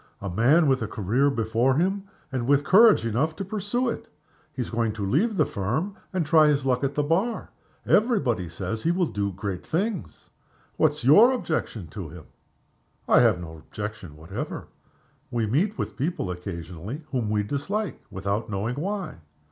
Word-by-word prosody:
A 100 -2 -4
man 135 - +4
with 135 -3 +2
a 115 - -1
career 115 +9 +1
before 115 +1 +1
him, 190 +5 0 0.3
and 125 -2 -2
with 140 0 +4
courage 210 - +6
enough 135 +8 0
to 195 - -5
pursue 215 +5 -1
it. 230 -1 -3 0.4
He 130 -4 -3
is - - -8
going 115 -2 0
to 105 -2 -4
leave 190 - +1
the - - +4
Firm, 135 - -2 0.2
and 185 -4 0
try 155 0 +6
his 145 -2 +2
luck 130 0 +1
at 140 +1 -1
the 150 - +1
Bar. 190 +10 0 0.3
Every 225 +1 +4
body 115 - -1
says 110 +6 -4
he 165 - 0
will 175 +1 +2
do 100 -8 -2
great 95 -1 -5
things. 180 - -3 0.4
What's 150 -3 +1
your 205 - +7
objection 160 - -2
to 95 -7 -7
him?" 80 -1 -11 0.8
"I - - +6
have 110 -7 +4
no 80 -2 -8
objection 100 -2 -7
whatever. 80 +6 -6 0.6
We 120 -3 0
meet 170 - +1
with - - -4
people 135 - -2
occasionally 90 - -6
whom 120 -6 -1
we 105 -1 +1
dislike 170 - -3
without 100 +4 -2
knowing 105 +5 -2
why. 195 - -3
130 Hz, 175 wpm, -25 LUFS, 105-175 Hz, 0.8 s, your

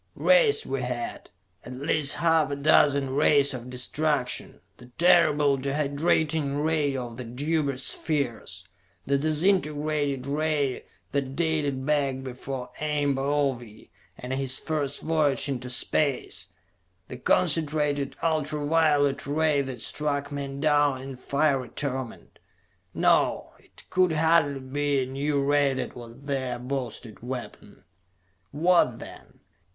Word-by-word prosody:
Rays - - +4
we 135 -1 -3
had; 125 -1 -5 0.3
at 125 - -9
least 145 +2 +1
half 165 -2 +2
a 140 - -2
dozen 140 -1 +3
rays 140 0 +3
of 125 -1 -7
destruction; 130 +1 -2 0.2
the 120 - -14
terrible 150 -5 +4
dehydrating 145 +1 0
ray 150 -4 +1
of 120 -2 -6
the 125 - -5
Deuber 140 +3 -1
Spheres, 135 -3 -3 0.4
the 140 0 +1
disintegrating 150 -4 +1
ray 145 -1 -1 0.3
that 135 -1 -2
dated 150 -5 -1
back 140 -3 0
before 130 0 -6
Ame 150 -2 0
Baove 135 -5 -2 0.3
and 125 +1 -5
his 135 -1 -1
first 145 -3 -3
voyage 155 -4 +1
into 130 -2 -4
space, 135 +2 0 0.6
the - - -8
concentrated 150 -3 +1
ultra 155 -2 0
violet 145 -3 +2
ray 150 0 +2
that 130 -2 -4
struck 145 -1 -2
men 140 -1 -5
down 145 -2 +2
in 135 0 -8
fiery 140 0 0
torment.... 130 -4 -4 0.6
No, - - +2
it - - -14
could 185 -2 +3
hardly 155 -3 +2
be 140 +1 -1
a - - -3
new 140 +2 -1
ray 140 -1 +2
that 130 - -4
was 120 +1 -11
their 135 -3 -3
boasted 125 -4 -5
weapon. 125 +1 -8 0.7
What, 160 -5 +3
then? - - -12
140 Hz, 125 wpm, -26 LUFS, 130-150 Hz, 0.7 s, Rays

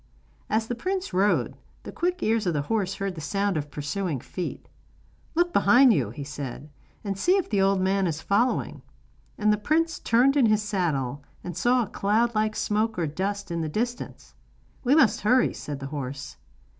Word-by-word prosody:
As 220 +1 +1
the 245 - -2
prince 370 - -3
rode, 195 +3 +2 0.3
the - - -7
quick 360 +1 -2
ears 220 -2 +1
of 170 - +1
his 145 -1 -1
horse 195 -2 -1
heard 195 -1 -3
the 160 - -8
sound 200 +4 -1
of 150 -1 -3
pursuing 150 +1 -3
feet. 180 +7 -6 0.7
'Look 345 +1 +2
behind 240 +5 +6
you,' 135 - 0
he 130 +6 -7
said, 140 +1 -7 0.3
'and 200 -2 -2
see 360 - +3
if 385 - -1
the 200 -2 +2
old 195 0 +3
man 190 0 +1
is 160 -2 -2
following.' 205 +9 0 0.6
And 210 0 +3
the 210 - -1
prince 325 +8 +1
turned 250 +4 +3
in 265 -5 +5
his 215 -1 +2
saddle 145 - -1 0.2
and 175 -2 -6
saw 245 +4 +2
a - - -6
cloud 220 +6 +1
like 215 0 0
smoke 215 +1 0
or 170 - 0
dust 195 +5 -3
in 170 -1 -1
the 160 - -2
distance. 240 +8 -4 0.5
'We 265 +3 +4
must 310 -8 +4
hurry,' 250 +4 +3
said 145 -2 -6
the 135 - -6
horse. 135 -1 -6
200 Hz, 190 wpm, -26 LUFS, 160-235 Hz, 0.7 s, behind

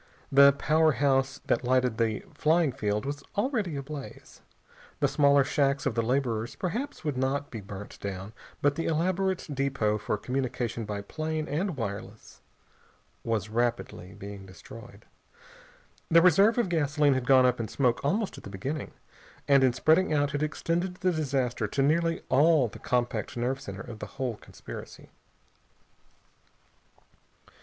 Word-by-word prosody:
The 140 0 +8
powerhouse 140 -3 +2
that - - +1
lighted 125 -2 +1
the 110 -2 0 0.2
landing 160 -1 +4
field 105 -4 -2
was 145 +1 -4 0.2
already 210 - 0
ablaze. 140 0 -8 0.6
The - - +3
smaller 140 -1 +4
shacks 140 0 +1
of 140 - +1
the 115 - +1
laborers 120 -2 -1
perhaps 225 +9 -4
would 145 -4 -1
not 135 +2 -1
be 115 - -6
burnt 100 +1 -9
down, 100 +1 -6 0.3
but 145 0 +4
the 165 +3 -3
elaborate 185 +3 0
depot 130 -6 0
for 105 - -2
communication 125 -1 -3
by 105 -1 -4
plane 155 +6 -3
and 170 +2 -2
wireless 110 -1 -7 0.8
was 110 -3 -1
rapidly 115 -5 -2
being 100 -1 -9
destroyed. 110 +3 -13 1.0
The 165 0 +6
reserve 195 +6 +5
of 240 - +2
gasoline 150 -4 +2
had 130 -1 -2
gone 130 -1 +6
up 125 -1 +2
in 115 - -2
smoke 125 -1 0
almost 200 +8 -1
at - - -17
the - - -8
beginning, 130 +10 -5 0.5
and 140 -1 +5
in 130 - +5
spreading 160 +9 +3
out 145 -1 +1
had 145 +1 -2
extended 170 +4 -1
the 185 0 0
disaster 135 -8 -1
to 135 +6 0
nearly 165 +3 +1
all 150 -1 +4
the 105 - -11
compact 120 -2 -1
nerve 130 +3 -1
center 100 0 -7
of 115 -3 -9
the - - -6
whole 125 -5 -2
conspiracy. - - -11
135 Hz, 150 wpm, -28 LUFS, 115-155 Hz, 1.0 s, The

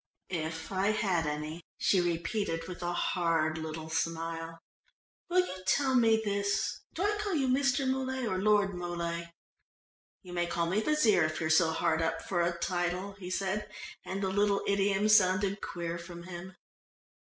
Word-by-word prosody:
"If 160 -1 -4
I 190 +1 +1
had 195 -7 +1
any," 150 +3 -4 0.2
she 190 - +3
repeated 170 0 -1
with 180 -1 -7
a 175 0 -1
hard 165 -3 +1
little 160 0 -5
smile. 165 0 -2 0.7
"Will 365 +1 +4
you 185 - -7
tell 270 +3 +3
me 225 -3 +5
this 200 0 0 0.2
do 355 - -1
I 415 +1 +1
call 410 -3 -1
you 270 -4 +1
Mr. 270 +1 +2
Muley 260 -1 -1
or 185 -4 -1
Lord 205 -1 +3
Muley?" 170 -1 -4 0.9
"You 180 -1 -10
may 175 -1 0
call 170 0 0
me 190 +6 +1
Wazeer, 235 - +4
if 155 0 -2
you're 160 0 0
so 160 +1 +5
hard 160 0 +1
up 165 0 0
for 175 -3 0
a 170 0 0
title," 180 +2 -1
he 180 -2 -6
said, 195 +3 -2 0.3
and 195 +1 -4
the 190 - +1
little 200 +1 +2
idiom 200 +1 +2
sounded 200 -1 +4
queer 170 -1 -4
from 170 0 -9
him. 185 +1 -8
185 Hz, 165 wpm, -31 LUFS, 170-210 Hz, 0.9 s, me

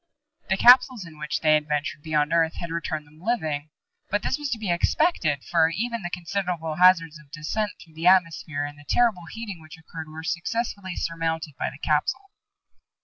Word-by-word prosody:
The 190 - +2
capsules 250 -2 +6
in 155 -2 -13
which 150 0 -3
they 155 -1 +4
had 150 0 +2
ventured 150 0 -2
beyond 150 0 0
Earth 165 -1 +2
had 170 -1 -6
returned 160 -2 -3
them 155 +2 -20
living. 155 -9 -1 0.4
But 205 +1 0
this - - -1
was 295 -1 -3
to 235 - -1
be 210 -5 -2
expected, 170 - +1
for 165 -2 +3
even 235 +6 -2
the 175 - -4
considerable 175 -3 -3
hazards 165 -4 +5
of 150 -2 -19
descent 165 +8 -3
through 165 - -16
the 165 +2 -1
atmosphere 165 -5 +3
and 145 0 -9
the 145 - -15
terrible 215 -8 +2
heating 210 -7 -7
which 155 0 -12
occurred 160 0 -9
were 160 +1 -9
successfully 190 +2 -3
surmounted 165 -2 -2
by - - -2
the 135 - -12
capsule. 155 - -1
165 Hz, 190 wpm, -25 LUFS, 155-195 Hz, 0.4 s, capsules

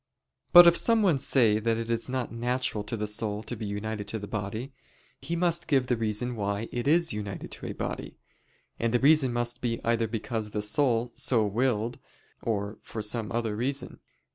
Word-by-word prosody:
But 175 -1 +11
if 170 0 +7
someone 205 - +3
say 115 -6 +4
that 115 +1 0
it 115 0 -3
is 115 +1 -1
not 130 -2 -2
natural 120 -2 -1
to 115 - -4
the 105 - -2
soul 105 0 -1
to 120 - -6
be 110 -1 -5
united 105 0 -4
to 110 - -3
the 100 -1 -7
body, 110 +6 -4 0.5
he 170 - -3
must 170 -1 0
give 135 -3 +2
the 125 - +1
reason 115 +2 -1
why 100 +1 -2
it 120 +1 -3
is 165 0 +3
united 100 -2 -6
to - - -7
a - - -4
body. - - -5 0.6
And 115 +1 0
the - - +4
reason 140 -1 +5
must 120 0 -2
be 115 -2 -1
either 115 -1 +1
because 110 0 -3
the 105 0 -3
soul 120 0 +1
so 115 -4 +1
willed, 115 +1 -1 0.4
or 105 -1 -3
for 110 - -6
some 105 0 0
other 115 -2 -1
reason. 135 +5 -2
115 Hz, 190 wpm, -28 LUFS, 105-130 Hz, 0.6 s, But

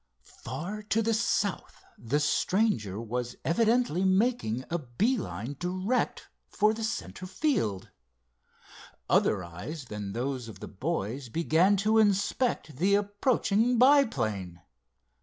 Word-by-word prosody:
Far 170 - -5
to 220 +1 0
the 225 +1 +1
south 210 -2 -1
the 120 +6 -1
stranger 150 - +1
was 120 +2 -4
evidently 220 -1 +2
making 190 - +1
a 170 - 0
bee 160 - 0
line 140 - -5
direct 185 +7 -1 0.2
for 210 +1 +2
the 225 0 -5
center 220 -4 -4
field. 180 - -1 1.2
Other 100 -3 +2
eyes 110 - -7
than 105 -4 -6
those 125 0 -3
of 105 -4 -10
the - - -7
boys 130 - -3
began 170 - +3
to 220 +1 +4
inspect 205 - +1
the 195 +6 +3
approaching 210 +2 +1
biplane. 115 - +2
175 Hz, 120 wpm, -28 LUFS, -, 1.2 s, to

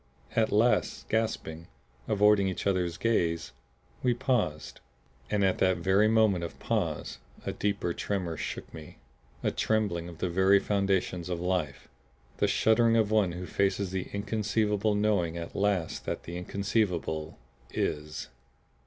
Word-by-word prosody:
At 110 -1 +2
last, 115 +4 +2
gasping, 85 -7 -2 0.4
avoiding 105 -2 +4
each 95 - -3
other's 90 -4 0
gaze, 85 - 0 0.5
we 125 -2 +2
paused. 90 - -1 0.5
And 100 +3 +1
at 95 - +1
that 95 -1 +3
very 95 +5 +3
moment 110 -5 +3
of 85 - -6
pause - - -2 0.3
a - - -1
deeper 100 -4 -1
tremor 90 -5 -2
shook - - -6
me, 75 -1 -10 0.5
a - - +1
trembling 100 -6 0
of 85 - -11
the 90 - -1
very 95 +3 +4
foundations 95 -3 0
of 90 -2 -2
life, 90 -6 -2 0.5
the - - +2
shuddering 115 +1 +3
of 110 -2 +2
one 105 -5 +3
who 90 +1 -5
faces 100 0 0
the 95 -1 -3
inconceivable 105 0 0
knowing 100 -6 +1
at 85 0 -7
last 100 -5 0
that - - -3
the 85 - -7
inconceivable 90 -4 -1 0.3
IS. 75 +1 -3
95 Hz, 140 wpm, -29 LUFS, 85-105 Hz, 0.5 s, avoiding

